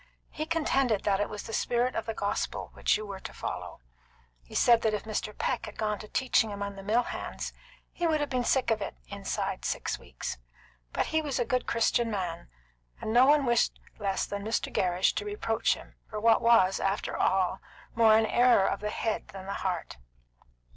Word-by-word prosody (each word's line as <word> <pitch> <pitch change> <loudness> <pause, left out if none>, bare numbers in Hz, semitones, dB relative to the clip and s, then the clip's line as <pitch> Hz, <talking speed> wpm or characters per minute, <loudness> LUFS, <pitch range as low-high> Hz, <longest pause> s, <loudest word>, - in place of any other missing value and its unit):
He 310 - -4
contended 275 -9 +1
that 195 -1 +2
it 205 - 0
was 210 - -6
the 225 - -8
spirit 245 +3 +1
of 225 - -3
the 225 - -3
gospel 200 - -2
which - - +2
you 215 - -6
were 200 -2 -7
to - - -8
follow. - - -6 0.6
He - - -13
said 235 -1 +5
that 220 -1 +2
if 205 - -4
Mr. 215 -1 -4
Peck 255 - -1
had - - -10
gone 210 -2 -1
to 215 - -9
teaching 235 -2 +2
among 200 0 -4
the 195 - -8
mill 220 +5 +2
hands, - - -5 0.4
he 345 - 0
would 315 -1 +2
have 290 - 0
been 250 -1 +1
sick 255 0 +2
of 220 -1 +1
it - - -4
inside - - -3
of - - -10
six - - -2
weeks; - - -6 0.5
but - - 0
he 315 - +3
was 290 -4 -2
a 245 - +1
good 255 +1 0
Christian 230 0 +2
man, 180 - -4 0.5
and 220 - -3
no 250 +2 +7
one 290 -1 +5
wished 235 -1 +2 0.2
less 195 -2 0
than 200 0 -5
Mr. 220 +1 -1
Gerrish 180 0 +2
to - - -2
reproach 415 0 0
him - - -13 0.2
for 215 - -4
what 225 +1 +4
was, 195 -5 +5
after 195 +1 -1
all, 190 0 +1 0.3
more 220 -1 +6
an 220 - +3
error 240 -3 +4
of 195 - 0
the 210 - -3
head 220 +1 -2
than 195 -3 -9
the 195 - -3
heart. 180 - -3
220 Hz, 210 wpm, -29 LUFS, 200-245 Hz, 0.6 s, no